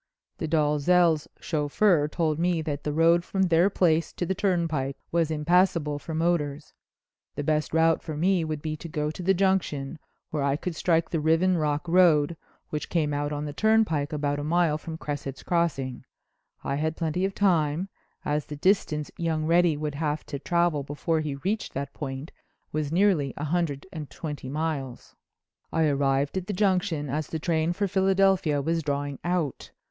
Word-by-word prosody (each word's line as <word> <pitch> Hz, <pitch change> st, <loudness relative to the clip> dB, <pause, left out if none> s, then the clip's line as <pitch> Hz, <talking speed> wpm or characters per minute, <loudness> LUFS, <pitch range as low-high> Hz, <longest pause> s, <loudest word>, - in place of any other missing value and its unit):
"The -, -, -2 dB
Dalzells' 155 Hz, +1 st, +3 dB
chauffeur 155 Hz, +1 st, +2 dB
told 155 Hz, 0 st, -1 dB
me 170 Hz, -2 st, +1 dB
that 145 Hz, -2 st, -4 dB
the 150 Hz, -, -1 dB
road 165 Hz, +3 st, +4 dB
from 190 Hz, +1 st, 0 dB
their 175 Hz, +1 st, +4 dB
place 165 Hz, -4 st, +2 dB
to 175 Hz, -, -3 dB
the 190 Hz, -, 0 dB
turnpike 165 Hz, -8 st, 0 dB
was 165 Hz, -2 st, +1 dB
impassable 160 Hz, -1 st, +2 dB
for 160 Hz, +2 st, -6 dB
motors. 155 Hz, -3 st, -1 dB, 0.6 s
The 145 Hz, -, -3 dB
best 155 Hz, +1 st, 0 dB
route 165 Hz, 0 st, +3 dB
for 155 Hz, -3 st, -6 dB
me 180 Hz, +2 st, +2 dB
would 155 Hz, -2 st, -4 dB
be 155 Hz, -1 st, -2 dB
to 170 Hz, -, -8 dB
go 150 Hz, -2 st, -2 dB
to 155 Hz, -, -8 dB
the 190 Hz, +2 st, +2 dB
Junction, 175 Hz, -6 st, 0 dB, 0.3 s
where 150 Hz, -, -1 dB
I 140 Hz, 0 st, +1 dB
could 170 Hz, +3 st, -4 dB
strike 165 Hz, 0 st, +1 dB
the 165 Hz, -, 0 dB
Riven 165 Hz, +4 st, +3 dB
Rock 150 Hz, 0 st, -1 dB
Road, 170 Hz, -3 st, +4 dB, 0.4 s
which 150 Hz, -, -3 dB
came 155 Hz, -4 st, 0 dB
out 145 Hz, 0 st, -1 dB
on 145 Hz, 0 st, -3 dB
the 145 Hz, -, -5 dB
turnpike 215 Hz, -9 st, +2 dB
about 145 Hz, -1 st, -1 dB
a -, -, -4 dB
mile 160 Hz, -1 st, +2 dB
from 160 Hz, +1 st, -7 dB
Cresset's 145 Hz, -3 st, -5 dB
Crossing. 140 Hz, -8 st, -1 dB, 0.6 s
I 140 Hz, -, -1 dB
had 155 Hz, +1 st, -1 dB
plenty 165 Hz, +2 st, -1 dB
of 195 Hz, 0 st, -1 dB
time, 170 Hz, -3 st, +2 dB, 0.4 s
as 150 Hz, 0 st, -1 dB
the 150 Hz, -, -6 dB
distance 150 Hz, -3 st, +1 dB
young 160 Hz, -2 st, -1 dB
Reddy 170 Hz, -1 st, +3 dB
would 150 Hz, -1 st, -3 dB
have 150 Hz, 0 st, -2 dB
to 140 Hz, -, -5 dB
travel 170 Hz, -1 st, +1 dB
before 145 Hz, +4 st, -1 dB
he 150 Hz, -3 st, -3 dB
reached 195 Hz, +10 st, -3 dB
that 140 Hz, +1 st, -4 dB
point 135 Hz, +1 st, -6 dB, 0.4 s
was 150 Hz, -1 st, -2 dB
nearly 170 Hz, -7 st, +2 dB
a 145 Hz, -, -4 dB
hundred 150 Hz, -3 st, -1 dB
and 155 Hz, -4 st, -6 dB
twenty 150 Hz, -5 st, -6 dB
miles. 145 Hz, -4 st, -4 dB, 0.6 s
"I 165 Hz, -, +1 dB
arrived 140 Hz, +1 st, +1 dB
at 185 Hz, -, -11 dB
the 205 Hz, -, -2 dB
Junction 185 Hz, -6 st, +1 dB
as 150 Hz, +2 st, -2 dB
the 160 Hz, -, -3 dB
train 160 Hz, 0 st, 0 dB
for 200 Hz, +3 st, -1 dB
Philadelphia 190 Hz, -5 st, +2 dB
was 165 Hz, +2 st, 0 dB
drawing 145 Hz, -1 st, -3 dB
out. 175 Hz, -6 st, -2 dB
155 Hz, 180 wpm, -26 LUFS, 145-175 Hz, 0.6 s, road